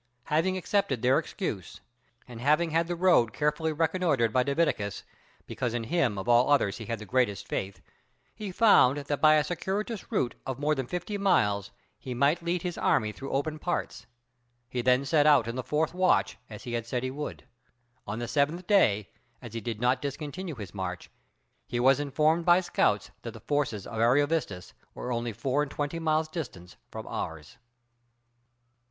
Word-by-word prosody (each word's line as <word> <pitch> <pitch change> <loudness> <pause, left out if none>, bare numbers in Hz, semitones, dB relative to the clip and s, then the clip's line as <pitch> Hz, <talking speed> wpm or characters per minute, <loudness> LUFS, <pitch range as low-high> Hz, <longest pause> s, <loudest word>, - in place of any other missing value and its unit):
Having 185 +5 +2
accepted 180 - 0
their 130 +2 +4
excuse, - - -5 0.5
and 120 -2 -9
having 155 +5 +2
had 165 +1 +1
the 175 - -2
road 170 - +3
carefully 150 +6 0
reconnoitred 155 -7 +1
by 130 - +4
Divitiacus, 140 - -1 0.4
because 120 -2 -3
in 120 - -2
him 135 - 0
of 95 - -5
all 120 +2 +4
others 130 -9 +2
he 110 - -7
had 115 - -2
the 105 - -9
greatest 120 -3 0
faith, 95 -2 -4 0.5
he 210 -3 -6
found 180 - +5
that 145 0 -3
by 155 0 +7
a 150 - +3
circuitous 200 +7 -4
route 130 - 0
of 130 -2 -4
more 150 +2 +1
than 135 -4 -3
fifty 180 +7 -4
miles 105 - +2 0.3
he 125 -2 -6
might 140 +7 +2
lead 170 0 -2
his 175 -2 -4
army 105 -1 +2
through 135 +5 -8
open 150 +3 -2
parts; 175 +2 -3 0.6
he 125 0 -3
then 125 +2 +3
set 150 0 +3
out 140 -7 +5
in 115 - -4
the 130 - -2
fourth 150 +5 -1
watch, 185 +1 +2
as 105 -2 -9
he 120 - -6
had 115 -1 -3
said 125 +1 -2
he 130 - -2
would. 150 +2 -6 0.6
On 105 +2 -3
the 120 0 -4
seventh 150 +7 0
day, 105 - +3 0.3
as 120 -4 -10
he 115 - -4
did 110 0 -4
not 125 +2 +2
discontinue 150 +4 -5
his 105 -6 -8
march, 95 -2 -5 0.6
he 120 - -2
was 135 +3 +4
informed 155 +4 +1
by 175 +1 +6
scouts 105 - 0
that 115 - -7
the - - -9
forces 140 -7 -1
of 115 - -6
Ariovistus 130 - +1 0.2
were 125 - -5
only 120 0 -2
four 130 +6 -1
and 150 - -2
twenty 145 +3 -3
miles 155 -1 +1
distant 120 - -7
from - - -7
ours. 80 -2 -6
140 Hz, 185 wpm, -28 LUFS, 115-160 Hz, 0.6 s, by